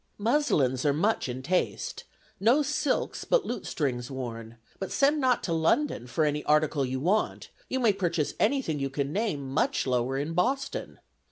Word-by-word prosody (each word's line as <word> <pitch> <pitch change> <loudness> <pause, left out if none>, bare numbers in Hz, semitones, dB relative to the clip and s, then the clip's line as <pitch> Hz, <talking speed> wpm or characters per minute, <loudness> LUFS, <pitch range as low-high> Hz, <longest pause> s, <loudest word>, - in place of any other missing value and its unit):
Muslins 205 - +2
are 145 - +3
much 170 0 +1
in 130 +1 -5
taste; 180 +6 -1 0.3
no 240 +9 +4
silks 295 -1 -1
but - - +2
lutestrings 130 - -2
worn; 115 -3 -6 0.2
but 195 - -4
send 290 +2 +3
not 255 -2 +2
to 170 - -1
London 165 - +1
for 155 +6 +1
any 150 0 -1
article 150 -1 +2
you 130 0 -2
want; 190 +9 0 0.2
you 260 - -1
may 230 -5 +4
purchase 170 -6 -1
any 270 +5 +2
thing 155 -7 -2
you 135 0 -1
can 140 +1 -2
name 180 -10 -1
much 265 - +1
lower 130 0 0
in 145 +4 -2
Boston. 255 +11 -1
160 Hz, 170 wpm, -28 LUFS, -, 0.3 s, no